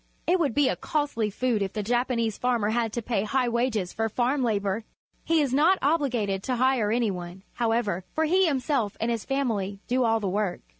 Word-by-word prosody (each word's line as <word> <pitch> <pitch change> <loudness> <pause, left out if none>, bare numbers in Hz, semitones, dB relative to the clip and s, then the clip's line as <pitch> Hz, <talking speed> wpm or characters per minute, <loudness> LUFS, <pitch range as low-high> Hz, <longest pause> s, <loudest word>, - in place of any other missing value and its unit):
It 360 +2 +2
would 285 -9 0
be 290 -2 +4
a - - +1
costly 290 -8 -1
food 230 +1 0
if 195 -1 -2
the 210 - -2
Japanese 235 -1 0
farmer 235 -4 0
had 230 -1 0
to 235 - -3
pay 220 -3 0
high 250 +3 0
wages 235 -6 -1
for 225 0 -1
farm 250 +5 0
labour. 210 -2 0 0.4
He 325 -1 +2
is 275 -3 0
not 325 +7 +4
obliged 245 -10 0
to 255 - 0
hire 250 -3 +2
any 230 -2 +1
one, 180 +1 -7
however, 225 -6 0
for 315 - +2
he 370 +3 +3
himself 265 -7 0
and 230 +1 0
his 230 -3 -3
family 220 -8 -1
do 255 +1 +1
all 225 -1 +2
the 205 - -2
work. 195 -1 -1
235 Hz, 205 wpm, -26 LUFS, 210-265 Hz, 0.4 s, be